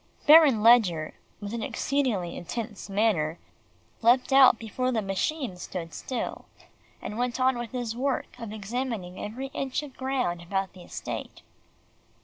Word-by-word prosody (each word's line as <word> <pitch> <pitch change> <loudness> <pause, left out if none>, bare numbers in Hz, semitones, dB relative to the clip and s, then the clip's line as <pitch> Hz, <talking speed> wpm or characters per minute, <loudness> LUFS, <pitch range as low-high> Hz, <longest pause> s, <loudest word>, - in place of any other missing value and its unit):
Baron 295 -8 +7
Ledgar, 195 -10 +5 0.3
with 205 +1 -6
an 235 - -3
exceedingly 230 -11 -1
intense 210 +3 -6
manner, 195 -6 +1 0.6
leaped 250 +3 +4
out 265 -3 +8
before 255 +3 -2
the 235 - +1
machine 195 - -2
stood 170 -2 -6
still, 255 - -4 0.6
and 210 - -5
went 245 +1 -1
on 260 0 +3
with 240 -1 -5
his 240 -3 -3
work 265 +1 -2
of 230 -3 -6
examining 215 -3 -4
every 260 +6 -5
inch 270 +2 -2
of 280 -3 -10
ground 255 -10 -1
about 195 +2 -2
the 185 - -13
estate. - - -7
230 Hz, 140 wpm, -27 LUFS, 195-255 Hz, 0.6 s, out